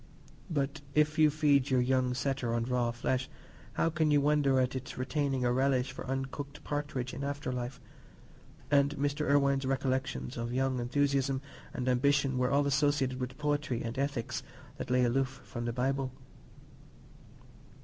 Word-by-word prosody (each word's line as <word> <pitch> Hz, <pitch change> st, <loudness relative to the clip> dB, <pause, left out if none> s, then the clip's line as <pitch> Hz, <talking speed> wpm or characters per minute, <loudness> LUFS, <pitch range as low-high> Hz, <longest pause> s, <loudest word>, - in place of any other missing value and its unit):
But 145 Hz, -1 st, -1 dB
if 150 Hz, +1 st, +3 dB
you 155 Hz, -1 st, +7 dB
feed 145 Hz, -2 st, +3 dB
your 130 Hz, -1 st, +3 dB
young 125 Hz, 0 st, +2 dB
setter 130 Hz, -3 st, -1 dB
on 115 Hz, -, 0 dB
raw 125 Hz, -1 st, 0 dB
flesh, 125 Hz, +2 st, -1 dB, 0.4 s
how 165 Hz, -, +1 dB
can 155 Hz, -1 st, +1 dB
you 145 Hz, -1 st, +5 dB
wonder 140 Hz, -2 st, +3 dB
at 130 Hz, 0 st, +1 dB
its 130 Hz, 0 st, -6 dB
retaining 135 Hz, 0 st, 0 dB
a 120 Hz, -, +2 dB
relish 130 Hz, 0 st, +2 dB
for -, -, -8 dB
uncooked 135 Hz, +2 st, -4 dB
partridge 145 Hz, -4 st, -3 dB
in 140 Hz, -, -5 dB
after 140 Hz, -1 st, -3 dB
life? 125 Hz, +1 st, -4 dB, 0.9 s
And 140 Hz, 0 st, +4 dB
Mr. 145 Hz, +2 st, 0 dB
Irwine's 140 Hz, -1 st, +3 dB
recollections 130 Hz, -, -1 dB
of 120 Hz, +1 st, -3 dB
young 130 Hz, -1 st, +1 dB
enthusiasm 135 Hz, +1 st, +1 dB, 0.3 s
and 125 Hz, -, -4 dB
ambition 135 Hz, +1 st, +2 dB
were 125 Hz, 0 st, +2 dB
all 140 Hz, +1 st, +3 dB
associated 140 Hz, -2 st, +1 dB
with 125 Hz, 0 st, -4 dB
poetry 145 Hz, -4 st, -1 dB
and 115 Hz, +1 st, -4 dB
ethics 140 Hz, -4 st, -2 dB, 0.4 s
that -, -, -5 dB
lay 125 Hz, 0 st, +3 dB
aloof 130 Hz, +2 st, 0 dB
from 120 Hz, -1 st, -5 dB
the 120 Hz, -, -1 dB
Bible. 130 Hz, +2 st, -1 dB
135 Hz, 160 wpm, -31 LUFS, 125-145 Hz, 0.9 s, you